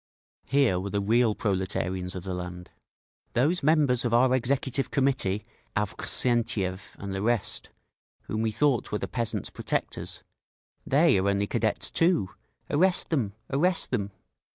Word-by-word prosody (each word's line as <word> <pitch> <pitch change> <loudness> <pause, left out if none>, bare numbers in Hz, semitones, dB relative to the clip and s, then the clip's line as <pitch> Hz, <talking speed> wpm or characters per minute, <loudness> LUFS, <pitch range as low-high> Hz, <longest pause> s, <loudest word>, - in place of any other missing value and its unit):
Here 135 -9 +3
were 100 +2 -4
the 100 - -1
real 110 +2 +3
proletarians 95 -2 -2
of 90 - -5
the 95 -1 -4
land…. 90 0 -6 0.6
"Those 150 +9 +2
members 145 -5 +3
of 120 -1 +1
our 130 +1 +4
Executive 130 +1 0
Committee, 130 -8 0 0.3
Avksentiev 105 -2 0
and 100 -1 -5
the 95 - -3
rest, 115 0 0 0.5
whom 110 - -3
we 110 - +1
thought 125 +3 +1
were 105 - 0
the - - -4
peasants' 115 -3 -2
protectors—they 145 - -2
are 100 +2 +1
only 100 0 +1
Cadets - - -1
too! 165 - +2 0.4
Arrest 180 +5 +3
them! 120 -11 0 0.2
Arrest 170 +6 +2
them!" 100 -6 -1
115 Hz, 135 wpm, -27 LUFS, 100-135 Hz, 0.6 s, our